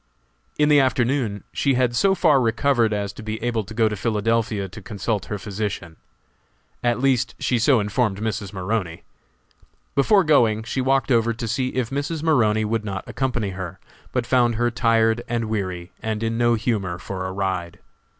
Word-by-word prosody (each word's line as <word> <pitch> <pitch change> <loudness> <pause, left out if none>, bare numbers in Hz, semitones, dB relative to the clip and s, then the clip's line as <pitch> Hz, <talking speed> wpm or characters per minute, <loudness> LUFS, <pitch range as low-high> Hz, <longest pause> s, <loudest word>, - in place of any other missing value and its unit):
In 150 - +3
the 150 -1 +6
afternoon 125 -5 +1
she 140 -2 +1
had 125 -1 +1
so 195 +7 +3
far 155 -7 +4
recovered 120 0 +2
as 100 -1 -2
to - - -10
be 110 0 -4
able 120 -2 0
to 100 - -10
go 115 -1 +3
to 105 - -2
Philadelphia 110 0 0
to 90 - -11
consult 105 -1 -3
her 105 - -4
physician. 100 -4 -4 0.9
At 120 0 +1
least 130 -1 +1
she 125 - 0
so 125 +2 +4
informed 105 0 0
Mrs. 105 -3 -3
Maroney. 95 -3 -3 0.9
Before 195 +8 +4
going 115 -8 +3
she 120 +3 -2
walked 135 0 +1
over 115 -1 +3
to 115 0 -5
see 130 +4 0
if 125 -2 -1
Mrs. 150 +3 -3
Maroney 110 -9 +3
would 110 0 -1
not 100 -3 -4
accompany 120 -6 -2
her, 95 -1 -7 0.3
but 125 -2 -1
found 120 -1 +3
her 120 +2 +1
tired 115 0 +2
and 120 -1 -1
weary, 95 -5 -3
and 110 0 -3
in 115 0 -1
no 120 0 +3
humor 105 -6 -1
for 95 +1 -5
a - - -4
ride. 95 -3 -3
115 Hz, 180 wpm, -23 LUFS, 105-125 Hz, 0.9 s, the